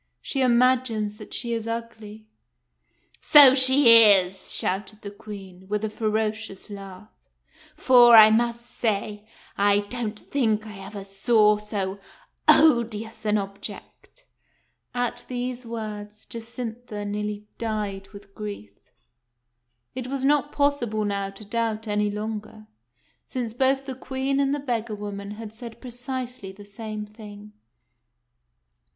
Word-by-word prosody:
She 270 - -3
imagines 240 -4 +2
that 215 - -12
she 235 -1 -2
is 225 -1 -3
ugly." 225 -2 -7 0.5
" - - -44
So 285 -3 +9
she 260 -3 +7
is," 190 -3 +3
shouted 195 +3 -3
the 200 - -6
Queen, 195 -3 -11
with 210 +1 -2
a 215 - -4
ferocious 215 -2 -3
laugh; 195 0 -10 0.3
" - - -28
for, 240 -2 +7
I 220 -1 +9
must 235 +1 0
say, 210 -2 -3 0.3
I 205 0 +4
don't 215 0 -5
think 220 -6 -1
I 210 -2 -10
ever 195 +1 -8
saw 210 +2 +3
so 200 -2 -4 0.5
odious 225 -7 +3
an 210 0 +2
object." 200 - -8 0.7
At 245 -1 -2
these 250 0 -5
words 215 -2 -7
Jacintha 230 -2 -7
nearly 210 0 -4
died 210 -4 -3
with 200 -1 -14
grief. 200 - -8 1.1
It 255 -1 -5
was 270 0 -3
not 290 +1 +2
possible 240 -7 0
now 200 -1 -2
to 195 +2 -11
doubt 225 0 -2
any 210 0 0
longer, 215 +1 -6 0.6
since 240 -4 -4
both 270 +2 +1
the 265 - -5
Queen 265 +1 -2
and 275 -1 +1
the 290 - -1
beggar 235 -5 -3
woman 200 -1 -7
had 220 -1 -8
said 230 0 -9
precisely 250 -3 -6
the 200 +1 -14
same 215 +1 -7
thing. 210 -1 -12
215 Hz, 130 wpm, -24 LUFS, 205-240 Hz, 1.1 s, So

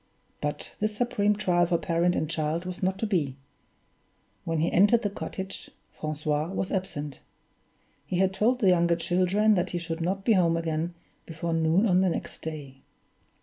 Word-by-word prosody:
But 150 0 -3
this 215 0 -1
supreme 210 -4 +2
trial 175 -4 +2
for 170 0 +2
parent 170 +1 +1
and 155 - 0
child 155 +2 -1
was 185 0 -6
not 190 0 0
to 220 - -1
be. 160 -11 0 1.1
When 165 0 -1
he 160 +2 +1
entered 210 +5 +5
the 205 - 0
cottage, 190 -1 -6 0.2
Francois 155 0 -2
was 190 +1 -3
absent. 150 -7 -3 0.9
He 175 - -1
had 190 +1 +2
told 245 +6 +2
the 195 - +5
younger 170 -1 +4
children 185 +5 +2
that 180 -2 +1
he 175 - -3
should 165 -1 -4
not 195 +3 -1
be 230 - +5
home 170 -4 +3
again 165 +1 -2 0.3
before 165 +1 -3
noon 165 +5 +3
on 185 -3 +4
the 190 - +3
next - - -4
day. 145 -4 -7
175 Hz, 175 wpm, -27 LUFS, 160-195 Hz, 1.1 s, entered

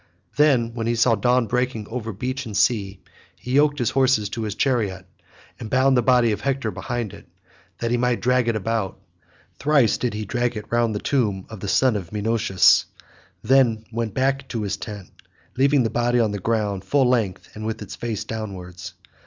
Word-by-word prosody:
Then, 130 -6 +3
when 115 -1 -3
he 120 - +1
saw 115 +1 +4
dawn 120 +3 +2
breaking 125 -2 -2
over 115 -1 -4
beach 130 +5 -4
and 105 -2 -4
sea, 100 -4 +1 0.3
he 125 - -8
yoked 145 +2 +3
his 120 -5 0
horses 130 -6 +2
to 115 - -5
his 105 -2 -3
chariot, 105 -9 0 0.5
and 110 - -7
bound 130 +2 +3
the 125 - +4
body 125 -2 +4
of 105 0 -3
Hector 135 -5 -1
behind 120 -4 -4
it - - -13 0.5
that 115 0 -2
he 120 - +2
might 125 0 +1
drag 125 -1 +2
it 115 - +1
about. 110 -2 -2 0.6
Thrice 140 -7 +3
did 120 -4 -2
he 105 0 -4
drag 120 +2 -1
it 105 - -6
round 120 -2 +1
the - - -1
tomb 105 -9 0
of 110 - -8
the 100 - -5
son 130 +3 +3
of 95 -5 -5
Menoetius, 110 -2 +3 0.6
and - - -3
then 120 -5 +4
went 115 -2 -3
back 135 +1 +1
into 120 -5 -5
his 100 -2 -2
tent, 105 -4 -8 0.4
leaving 135 +1 +3
the 115 - -1
body 120 +1 +1
on 110 -3 +2
the 105 - -4
ground 105 -2 -1
full 135 +6 +2
length 110 -7 0
and 110 - -8
with 110 0 -4
its 100 - -8
face 115 -4 -4
downwards. 95 -4 -7
115 Hz, 200 wpm, -23 LUFS, 105-125 Hz, 0.6 s, saw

